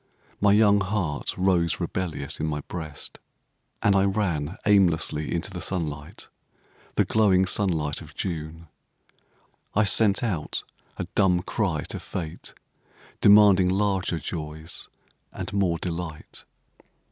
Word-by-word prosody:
My 105 0 +4
young 105 -1 +5
heart 95 -6 -2
rose 90 -3 +2
rebellious 85 -7 -3
in 80 - -1
my 75 -1 -2
breast; 80 -1 -7 0.6
and 100 -1 +4
I 95 - +4
ran 95 -4 -1
aimlessly 85 -7 +2
into 85 +4 -2
the 90 -2 -6
sunlight—the 75 -5 -5
glowing 95 -4 +3
sunlight 85 -7 0
of - - -13
June. 80 -1 -5 1.1
I 105 - +4
sent 100 +1 +3
out 90 -10 -2 0.3
a - - -2
dumb 90 -3 +3
cry 95 -8 -1
to - - -5
Fate, 80 -4 -6 0.7
demanding 100 -3 +7
larger 95 -2 0
joys 80 -1 -6 0.4
and - - -6
more 95 -4 +1
delight. 85 -2 -6
90 Hz, 115 wpm, -25 LUFS, 80-100 Hz, 1.1 s, demanding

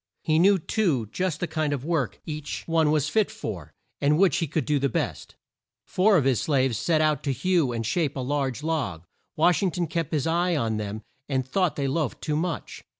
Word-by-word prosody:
He 155 0 +2
knew, 195 +3 +5
too, 155 - 0
just 180 -4 -2
the - - +1
kind 155 -2 -1
of 140 -1 -4
work 155 -8 -1
each 150 -2 -5
one 165 -2 +2
was 150 -1 +2
fit 215 +5 +2
for, 110 - -6 0.3
and 145 +2 +3
which 190 +1 +4
he 165 - 0
could 155 +2 -1
do 150 -1 +1
the 140 0 +1
best. - - -3 0.5
Four 195 +2 +3
of 145 - +1
his 130 -4 +2
slaves 130 -6 +1
set 155 +7 +2
out 155 -1 +2
to 140 - -1
hew 165 0 +1
and 115 -1 -3
shape 145 +4 0
a - - -4
large 135 -1 -2
log. 150 - -2 0.3
Wash 165 0 +3
ing 195 - +2
ton 175 0 -2
kept 165 -1 -3
his 150 -4 0
eye 170 +2 +1
on 115 -6 0
them 105 +1 -5 0.3
and 130 -2 -1
thought 180 +3 +1
they 140 -1 -1
loafed 145 0 -1
too 150 -2 -2
much. 165 +1 -3
150 Hz, 215 wpm, -26 LUFS, 135-170 Hz, 0.5 s, knew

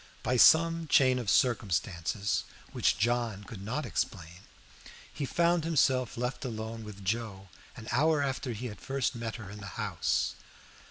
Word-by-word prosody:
By 125 - +1
some 165 +5 +5
chain 130 -3 +4
of 115 -5 -3
circumstances 100 - +1 0.3
which - - +1
John 115 -2 0
could 100 -1 -9
not 115 +9 -3
explain, 90 -5 -4 0.7
he 145 - -3
found 170 +1 +2
himself 130 -7 +1
left 125 +4 -3
alone 110 -2 -5
with 100 -2 -10
Joe 100 -2 -3 0.3
an 110 - -10
hour 150 +3 +3
after 135 -1 -2
he 115 +4 -6
had 105 -4 -7
first 135 -4 -1
met 115 -2 -5
her 105 -4 -8
in 105 - -9
the 100 - -8
house. - - 0
120 Hz, 155 wpm, -30 LUFS, 105-135 Hz, 0.7 s, some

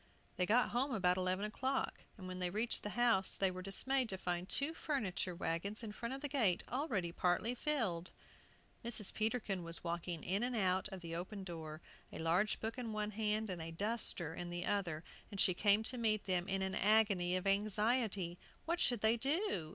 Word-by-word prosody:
They 180 - +2
got 245 +4 +4
home 265 +4 0
about 180 -3 +3
eleven 185 +2 0
o'clock, 260 +5 -2
and 185 -3 -8
when 185 0 -5
they 180 -1 0
reached 220 +5 +1
the 210 - -4
house 230 -6 +3
were 185 -1 +1
dismayed 250 +6 +1
to 190 - -2
find 180 0 -3
two 285 +3 +2
furniture 205 - -2
wagons 195 +6 -1
in 215 - -4
front 235 +4 -4
of 270 - -8
the 290 - -1
gate, 230 -11 +2
already 235 - -1
partly 180 +7 +1
filled! 225 - -1 0.7
Mrs. 230 -4 +1
Peterkin 215 -4 -1
was 165 0 -3
walking 170 -1 -3
in 195 +3 0
and 245 0 0
out 190 -3 +2
of 190 -3 -8
the 165 -1 -5
open 190 +3 -5
door, 160 -3 -7 0.3
a - - -7
large 175 +6 +1
book 225 +3 -4
in 230 -3 -4
one 210 0 -2
hand, 215 +1 0
and 175 -2 -4
a 160 - -5
duster 185 -3 0
in 175 +1 -5
the 175 0 -3
other, 175 -6 -1 0.3
and 200 - -7
she 185 - +5
came 205 +3 +4
to 250 +2 -2
meet 215 -2 +2
them 180 -1 +1
in 195 0 0
an 190 0 -1
agony 200 -4 +3
of 185 - -2
anxiety. 205 -2 +1 0.3
What 340 +2 0
should 240 -4 +2
they 220 +2 +4
do? 270 - 0
200 Hz, 195 wpm, -37 LUFS, 180-230 Hz, 0.7 s, she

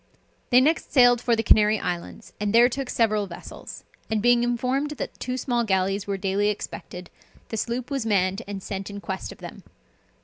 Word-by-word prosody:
They 250 - +6
next 310 +4 +1
sailed 245 -3 +5
for 240 -1 +2
the 225 - -1
Canary 215 0 +5
Islands, 180 +4 -5
and 210 +1 0
there 240 +1 +7
took 265 0 -4
several 215 -3 +1
vessels; 170 -1 -10 0.3
and 220 -1 +1
being 240 +2 +4
informed 255 +4 0
that - - -6
two 255 0 -3
small 240 -2 0
galleys 195 -1 0
were 200 -1 -1
daily 195 +2 0
expected, 180 -3 -6 0.4
the 225 - -4
sloop 235 +5 -3
was 275 -3 -1
manned 195 -2 +1
and 200 -2 -6
sent 195 0 -5
in 200 0 -7
quest 190 -1 -5
of - - -11
them. - - -10
220 Hz, 190 wpm, -25 LUFS, 195-245 Hz, 0.4 s, there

